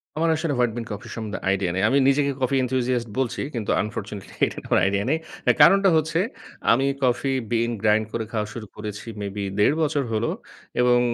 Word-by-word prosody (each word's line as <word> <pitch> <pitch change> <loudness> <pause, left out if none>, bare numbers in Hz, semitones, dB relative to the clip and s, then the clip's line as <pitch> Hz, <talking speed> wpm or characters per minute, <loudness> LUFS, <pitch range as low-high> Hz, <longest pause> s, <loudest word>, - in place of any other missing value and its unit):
আমার 165 +2 +1
আসলে 160 -2 -1
white 120 -3 +2
bean 115 - -4
coffee 105 0 -7
সম্বন্ধে 105 -4 -4
আইডিয়া 95 -2 +1
নাই। 95 - 0
আমি 135 - +3
নিজেকে 140 0 +3
কফি 130 +1 +1
এনথুসিয়াস্ট 125 -2 0
বলছি 125 -3 -1
কিন্তু, 110 -3 -2
আনফরচুনেটলি 105 -2 -6
এটার - - -7
কোন - - +4
আইডিয়া 100 +1 +1
নাই। 155 - +2 0.3
এ - - +9
কারণটা 195 +5 +7
হচ্ছে, 160 +2 0 0.5
আমি 135 - +3 0.2
কফি 130 +2 +1 0.2
বিন 115 0 +1
গ্রাইন্ড 110 0 +3
করে 115 -1 -2
খাওয়া 105 -2 -1
শুরু 110 -3 -7
করেছি, 105 +1 -7
মেবি 100 0 -4 0.2
১/২ 125 +8 +4
বছর 145 -2 +1
হলো 110 +2 0 0.5
এবং 125 0 +5
120 Hz, 190 wpm, -24 LUFS, 105-135 Hz, 0.5 s, এ